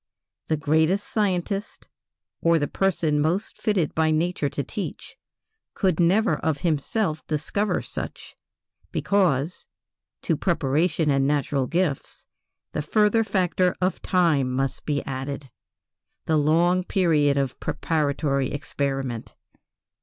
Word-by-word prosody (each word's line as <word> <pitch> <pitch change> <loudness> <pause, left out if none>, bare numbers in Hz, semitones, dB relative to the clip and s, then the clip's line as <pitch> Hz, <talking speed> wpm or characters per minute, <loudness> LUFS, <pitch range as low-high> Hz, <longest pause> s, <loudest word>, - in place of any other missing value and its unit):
The 155 - +1
greatest 160 +6 +2
scientist, 200 0 -2 0.5
or 170 0 +4
the 145 -2 0
person 165 -6 +1
most 165 +7 -1
fitted 190 -8 +1
by 160 0 +2
nature 155 -1 0
to 140 - -3
teach, 195 +9 -6 0.6
could 185 -5 +1
never 195 +7 +3
of 155 -3 -1
himself 160 +2 0
discover 165 +7 -1
such, - - -7 0.6
because, 175 -5 +1 0.6
to 165 - +1
preparation 155 0 +1
and 135 0 +2
natural 140 -2 0
gifts, 170 -4 -2 0.5
the - - -2
further 210 +7 +3
factor 185 -3 +1
of 185 +1 0
time 160 -8 +2
must 135 +1 -2
be 145 -1 0
added 135 0 -5 0.7
the 160 - +2
long 170 +5 +3
period 155 -7 +2
of 135 -2 -1
preparatory 145 -3 0
experiment. 135 -4 -3
160 Hz, 115 wpm, -24 LUFS, 145-185 Hz, 0.7 s, or